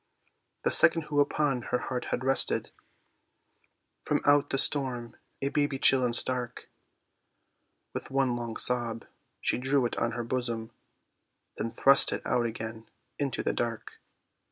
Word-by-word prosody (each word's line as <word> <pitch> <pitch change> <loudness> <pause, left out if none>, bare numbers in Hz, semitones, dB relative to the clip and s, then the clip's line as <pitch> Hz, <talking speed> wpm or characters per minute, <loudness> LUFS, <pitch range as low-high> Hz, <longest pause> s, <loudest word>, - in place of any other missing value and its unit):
The - - 0
second 165 -1 +7
who 150 -1 -2
upon 145 -2 0
her 125 - 0
heart 125 0 -5
had 125 - -4
rested 135 +1 +1 1.3
From - - -1
out 145 0 +3
the 135 - -1
storm, 130 -5 0 0.3
a 140 - 0
baby 145 -1 -1
chill 130 -1 +5
and 120 -1 0
stark, 125 -1 -2 1.2
With - - -6
one 135 -2 0
long 120 -2 -6
sob 120 -2 -1 0.4
she - - -1
drew 135 0 0
it 120 - -3
on 115 -1 -2
her 120 0 -4
bosom, 115 -2 -4 0.9
Then 115 - -3
thrust 135 +4 +5
it - - -5
out 120 -2 0
again 110 0 -8 0.3
into 140 -4 -3
the - - -1
dark. 115 -2 -5
125 Hz, 145 wpm, -27 LUFS, 120-135 Hz, 1.3 s, second